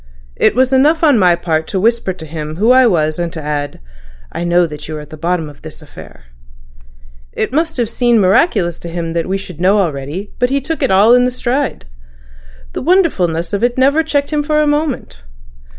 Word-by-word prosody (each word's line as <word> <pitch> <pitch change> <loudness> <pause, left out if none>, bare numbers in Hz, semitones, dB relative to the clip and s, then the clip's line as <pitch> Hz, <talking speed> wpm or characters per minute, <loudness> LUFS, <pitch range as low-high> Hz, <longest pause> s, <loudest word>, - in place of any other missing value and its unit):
It - - +2
was 260 +1 +2
enough 300 +5 +3
on 290 -7 +4
my 180 -3 +4
part 160 -2 -2
to 190 - -2
whisper 230 -1 +1
to 175 -3 -9
him 155 0 -6
who 215 +8 +2
I 255 -1 +6
was 155 -5 0
and 170 -1 -2
to 165 - -6
add 145 -1 -4 0.5
'I - - -4
know 175 0 +3
that 150 -2 -8
you 155 0 -5
are - - -6
at 150 0 -12
the - - -8
bottom 165 +1 -2
of 145 - -14
this - - -10
affair.' - - -14 1.1
It 215 - -3
must 320 +1 -1
have 240 -2 0
seemed 240 0 +1
miraculous 185 - +2
to 170 - -8
him 165 -1 -4
that 170 +1 -2
we 195 - 0
should 180 -4 -10
know 195 +3 +3
already, 165 +2 -3
but 245 - +2
he 275 +1 +1
took 310 +4 -4
it 270 - +1
all 200 +5 +5
in 250 0 +4
the - - +1
stride. 255 - -2 0.9
The - - -4
wonderfulness 185 - +1
of 200 - -1
it 240 +1 +1
never 280 +4 +3
checked 295 -2 -2
him 300 - +1
for 300 +1 0
a 305 - +3
moment. 295 - -2
195 Hz, 215 wpm, -15 LUFS, 165-260 Hz, 1.1 s, I